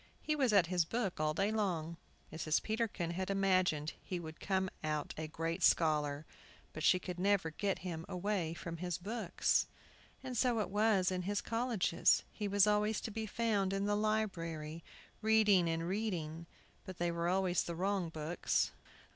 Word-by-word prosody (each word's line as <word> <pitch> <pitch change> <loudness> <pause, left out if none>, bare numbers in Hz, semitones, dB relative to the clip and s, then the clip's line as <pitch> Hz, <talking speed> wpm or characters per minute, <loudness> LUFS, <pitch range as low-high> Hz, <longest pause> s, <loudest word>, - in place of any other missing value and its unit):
He 305 - -1
was 265 -5 +2
at 200 -4 +5
his 175 0 +2
book 200 +1 -2
all 155 0 +1
day 200 +4 +1
long. 175 -7 -1 0.4
Mrs 160 -1 0
Peterkin 215 -6 -1
had 185 +2 -3
imagined 185 -6 +2
he 180 - -4
would 160 -2 -8
come 190 -1 0 0.2
out 150 -1 -2
a 155 0 -4
great 165 +3 -3
scholar, 150 -3 +3 0.5
because 155 - -5
she 185 - +6
could 180 -1 -6
never 195 -4 +2
get 195 +4 -1
him 165 -3 -4
away 180 -3 -1
from 170 -1 -6
his 180 0 -3
books. 205 0 0 0.6
And 255 -1 -5
so 240 0 +2
it 210 - -2
was 205 -3 +3
in 185 0 -1
his 205 +3 -1
colleges; 230 -7 +2
he 210 - -3
was 200 0 +4
always 210 +1 +2
to 225 - -5
be 220 +1 -4
found 205 -3 0
in 195 0 0
the 205 0 +1
library, 170 -7 -2 0.4
reading 215 -5 +4
and 165 +1 -1
reading. 170 -5 -3 0.4
But 185 -2 -8
they 175 0 0
were 170 0 -1
always 185 -1 +2
the 170 - -4
wrong 190 0 0
books. 160 +2 -1
185 Hz, 170 wpm, -35 LUFS, 165-210 Hz, 0.6 s, she